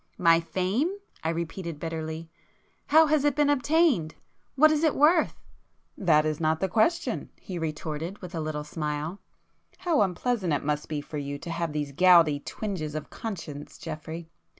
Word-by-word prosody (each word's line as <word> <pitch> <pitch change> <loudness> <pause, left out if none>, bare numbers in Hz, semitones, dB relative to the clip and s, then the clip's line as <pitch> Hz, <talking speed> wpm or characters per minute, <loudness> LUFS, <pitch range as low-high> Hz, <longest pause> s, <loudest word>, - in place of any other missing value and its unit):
"My 165 -3 +5
fame!" 190 - 0 0.3
I 160 - 0
repeated 170 -1 -4
bitterly—"How 165 - -1
has 305 -2 +2
it 290 -2 +2
been 295 -1 +3
obtained? 285 - +2 0.4
What 310 +3 +6
is 310 0 +1
it 315 - +3
worth?" 315 +4 +4 0.6
"That 155 -5 +3
is 155 -1 -1
not 160 -1 +1
the 190 - +1
question;" 330 - +1
he 185 -4 -6
retorted 160 +3 -4
with 180 -2 -10
a 165 - -3
little 155 -1 -3
smile; 150 +3 -4 0.6
"How 335 -5 +1
unpleasant 190 -1 0
it 145 - -1
must 150 0 -1
be 150 -2 -2
for 150 +1 -6
you 145 0 -4
to 170 - -7
have 165 -1 -2
these 150 -1 -3
gouty 170 -2 +5
twinges 155 -4 -4
of 155 - -5
conscience 165 -9 -7
Geoffrey! 160 +2 -7
170 Hz, 160 wpm, -27 LUFS, 155-225 Hz, 0.6 s, What